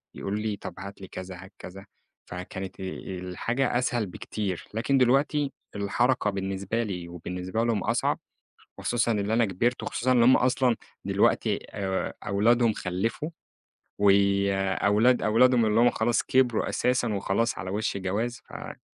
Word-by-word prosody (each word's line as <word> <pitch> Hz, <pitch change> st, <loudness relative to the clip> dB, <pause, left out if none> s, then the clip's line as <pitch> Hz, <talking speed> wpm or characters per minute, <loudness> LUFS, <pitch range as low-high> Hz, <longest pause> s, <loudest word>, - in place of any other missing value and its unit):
يقولوا 100 Hz, +2 st, -3 dB
لي 105 Hz, -1 st, -2 dB
طب -, -, -7 dB
هات 100 Hz, +1 st, -9 dB
لي 95 Hz, -, -8 dB
كذا 95 Hz, 0 st, -7 dB
هات 95 Hz, +1 st, -15 dB
كذا، 95 Hz, +2 st, -10 dB, 0.4 s
فكانت 90 Hz, +1 st, -7 dB
آآ -, -, -5 dB, 0.4 s
الحاجة 115 Hz, +9 st, -1 dB
أسهل 120 Hz, -2 st, 0 dB
بكتير، 95 Hz, 0 st, -5 dB
لكن 120 Hz, +5 st, +1 dB
دلوقتي 140 Hz, +3 st, +2 dB, 0.2 s
الحركة 105 Hz, +4 st, +1 dB
بالنسبة 95 Hz, +3 st, -2 dB
لي 90 Hz, -5 st, -5 dB
وبالنسبة 90 Hz, +5 st, -3 dB
لهم 115 Hz, -4 st, 0 dB
أصعب، -, -, 0 dB, 0.6 s
خصوصًا 120 Hz, -1 st, +1 dB
إن 105 Hz, -1 st, -1 dB
أنا 115 Hz, +1 st, +3 dB
كِبِرت، 115 Hz, +5 st, 0 dB
وخصوصًا 130 Hz, +2 st, 0 dB
إن 120 Hz, -2 st, +4 dB
هم 130 Hz, +2 st, +7 dB
أصلًا 125 Hz, -1 st, +2 dB, 0.3 s
دلوقتي -, -, +2 dB
آآ، 95 Hz, -1 st, -2 dB
أولادهم 115 Hz, +4 st, +3 dB
خلِّفوا، 110 Hz, -, -3 dB, 0.7 s
وأولاد 100 Hz, +3 st, +3 dB
أولادهم 120 Hz, +2 st, +4 dB
اللي 110 Hz, +1 st, +3 dB
هم 120 Hz, +1 st, +6 dB
خلاص 115 Hz, +1 st, +1 dB
كبروا 125 Hz, -3 st, +2 dB
أساسًا 125 Hz, -3 st, +1 dB
وخلاص 100 Hz, +4 st, 0 dB
على 90 Hz, +2 st, -5 dB
وش 105 Hz, +2 st, -1 dB
جواز، 105 Hz, +6 st, -2 dB
فلأ -, -, -10 dB
105 Hz, 145 wpm, -27 LUFS, 95-120 Hz, 0.7 s, هم